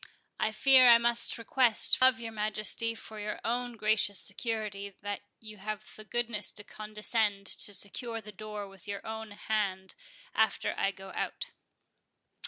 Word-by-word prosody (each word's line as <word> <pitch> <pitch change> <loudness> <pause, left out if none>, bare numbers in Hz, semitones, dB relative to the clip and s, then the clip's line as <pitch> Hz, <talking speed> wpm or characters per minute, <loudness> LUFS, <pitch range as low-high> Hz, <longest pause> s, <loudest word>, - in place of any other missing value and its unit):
I 215 - +1
fear 255 +2 +7
I 235 - +10
must 235 0 +2
request 230 0 +3
of 255 -3 +5
your 230 -1 -5
Majesty, 215 +1 -1
for 220 -1 -9
your 210 0 -4
own 245 0 -1
gracious 215 -1 +2
security, 200 0 -2
that 205 0 -3 0.2
you 215 -1 -11
have 210 -2 -6
the 215 - -11
goodness 235 -2 -1
to 205 - -4
condescend 210 -1 -1
to 205 - +4
secure 225 +4 -1
the 215 -1 -11
door 210 0 -7
with 195 0 -14
your 200 -1 -5
own 220 0 -5
hand 205 -2 -2 0.4
after 220 -2 +1
I - - +1
go 195 0 -9
out." - - -4
215 Hz, 155 wpm, -30 LUFS, 205-230 Hz, 0.4 s, I